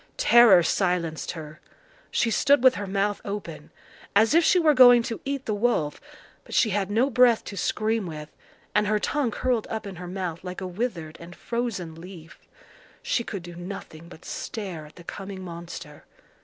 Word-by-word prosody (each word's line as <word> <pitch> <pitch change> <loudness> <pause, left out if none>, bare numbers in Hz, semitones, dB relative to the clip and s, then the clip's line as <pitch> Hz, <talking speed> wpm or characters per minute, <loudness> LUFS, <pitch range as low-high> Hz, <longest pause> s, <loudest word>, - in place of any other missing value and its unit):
Terror 235 - +7
silenced 175 -3 -1
her. 155 -2 -9 0.5
She 230 - +1
stood 280 +2 +3
with 260 -1 +7
her 205 -4 -5
mouth 200 +1 -1
open, 205 0 -6 0.5
as 220 +6 +5
if 335 +1 +5
she 360 - +4
were 320 -4 +4
going 245 -3 +7
to 230 - -5
eat 275 -1 -3
the 215 - -1
wolf, 205 -9 0 0.4
but - - -8
she 220 - +3
had 195 -1 -1
no 235 +7 +2
breath 245 -2 +4
to 200 - -8
scream 215 +1 -1
with, 150 -2 -7 0.4
and 210 0 +2
her 215 +1 +2
tongue 275 +4 0
curled 240 0 -1
up 220 -1 -4
in 195 -3 -8
her 180 +1 -7
mouth 180 -2 -5
like 180 0 -6
a 190 - -5
withered 180 -5 -4
and 170 +2 -11
frozen 230 -9 -4
leaf. 165 0 -12 0.6
She 470 - 0
could 200 -6 -6
do 175 0 -10
nothing 175 -2 -9
but 160 - -14
stare 185 -8 -6
at 150 - -19
the 175 - -13
coming 190 +1 -7
monster. 170 -3 -9
200 Hz, 185 wpm, -25 LUFS, 175-235 Hz, 0.6 s, Terror